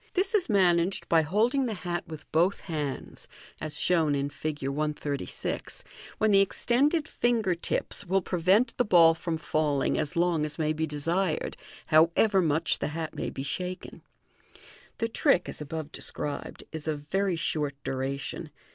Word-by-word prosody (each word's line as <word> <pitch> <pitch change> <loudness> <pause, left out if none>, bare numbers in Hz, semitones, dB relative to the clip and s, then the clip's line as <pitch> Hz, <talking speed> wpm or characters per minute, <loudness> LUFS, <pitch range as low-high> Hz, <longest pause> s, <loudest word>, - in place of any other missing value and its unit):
This 385 +2 +1
is 405 -9 +2
managed 185 -2 +2
by 165 -1 +5
holding 230 - +1
the 220 - -3
hat 175 -1 -3
with 155 -2 -10
both 175 +5 +2
hands, 150 -6 -5 0.3
as 155 -1 -4
shown 160 -5 +3
in 140 +1 -1
Fig. 150 -3 -4
136, 145 0 -3 0.3
when 215 0 +3
the 195 - +6
extended 285 - +1
finger 230 -6 +1
tips 170 +3 -3
will 190 +1 +2
prevent 185 +8 +2
the 245 - +4
ball 170 -6 +6
from 165 0 -3
falling 150 -2 0
as 150 - -2
long 170 -2 +2
as 150 -1 -3
may 155 -1 +1
be 160 +1 -1
desired, 165 +4 -1 0.3
however 170 +6 +4
much 160 0 +1
the - - -1
hat 160 -1 -4
may - - -3
be 135 - -5
shaken. 180 +5 -5 1.0
The 230 - 0
trick, 230 - +2
as - - -6
above 155 0 -5
described, 145 -2 -5
is 160 -1 -6
of 150 -2 -2
very 190 +5 0
short 150 -3 -1
duration. 135 +1 -3
165 Hz, 155 wpm, -28 LUFS, 150-195 Hz, 1.0 s, the